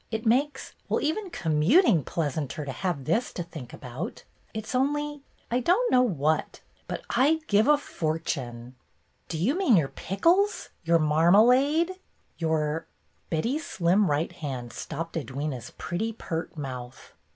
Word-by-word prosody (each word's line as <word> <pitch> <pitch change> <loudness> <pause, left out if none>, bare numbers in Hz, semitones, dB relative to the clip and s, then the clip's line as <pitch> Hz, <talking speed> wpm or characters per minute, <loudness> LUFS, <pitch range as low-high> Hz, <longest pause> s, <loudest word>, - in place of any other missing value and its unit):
It 220 0 -3
makes 270 +6 +1
— - - -38
well, - - +2
even 370 +6 -1
commuting 170 - +3
pleas 150 -3 -2
anter 150 0 -3
to 135 - -4
have 160 -3 -3
this 220 +11 +1
to 175 - -3
think 155 -7 -9
about! 130 +5 -7 0.3
It's 220 +2 -5
only 295 +2 0 0.2
— - - -35
I 245 - +2
don't 370 - +2
know 250 - +6
what, 155 - 0 0.3
but - - -4
I'd 310 +6 +3
give 210 -3 +3
a 300 0 +6
fortune 140 - -3 0.2
— - - -42
" - - -43
"Do 165 - -3
you 195 - +2
mean 355 - +4
your 145 -5 +1
pickles, 350 - +1
your 170 0 +4
mar 155 +2 +3
malade, 280 - +4 0.4
your 160 -1 0
— - - -42
" - - -41
Betty's 240 - -1
slim 185 +3 +2
right 150 +3 0
hand 130 -6 -6
stopped 165 +3 -5
Edwyna's 140 -3 -4
pretty, 200 +8 -2
pert 165 -6 -5
mouth. 130 -3 -7
175 Hz, 165 wpm, -27 LUFS, -, 0.4 s, know